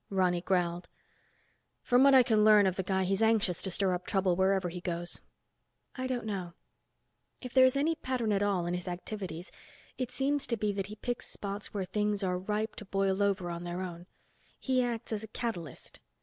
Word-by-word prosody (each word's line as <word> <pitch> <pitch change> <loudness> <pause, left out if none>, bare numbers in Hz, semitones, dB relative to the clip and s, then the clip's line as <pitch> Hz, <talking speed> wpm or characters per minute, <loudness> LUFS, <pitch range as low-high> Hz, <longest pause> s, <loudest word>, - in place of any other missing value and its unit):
Ronny 180 -3 +1
growled. 175 -1 0 1.0
"From 245 +1 +4
what 275 -1 +7
I 260 - +8
can 220 -3 +3
learn 210 -1 +7
of 185 -2 +1
the 190 - -1
guy 190 +1 0
he's 195 +3 0
anxious 220 -6 +2
to 190 - -2
stir 190 0 +1
up 180 0 -4
trouble 190 -2 +2
wherever 190 0 +2
he 175 +1 -7
goes." 175 -1 -4 0.7
"I 255 0 -3
don't 250 -3 -2
know. 185 -5 -4 0.9
If 250 -2 -8
there's 260 0 +6
any 300 +4 +2
pattern 255 -8 -2
at 200 -1 +2
all 195 -4 +1
in 175 - -1
his 180 +1 -4
activities, 180 -1 -6 0.5
it 255 -2 -1
seems 275 +2 0
to 235 -2 -1
be 210 -1 0
that 195 -1 -3
he 210 - -8
picks 245 +3 -4
spots 200 +1 -5
where 195 -3 -2
things 210 +1 -1
are 180 -1 0
ripe 210 +3 -2
to 210 - -7
boil 195 0 0
over 190 -3 +1
on 170 0 -5
their 175 +1 -4
own. 175 -1 -7 0.5
He 260 -1 +1
acts 235 -2 -3
as 210 - -2
a 220 - -8
catalyst. 215 - -6
200 Hz, 200 wpm, -31 LUFS, 180-225 Hz, 1.0 s, I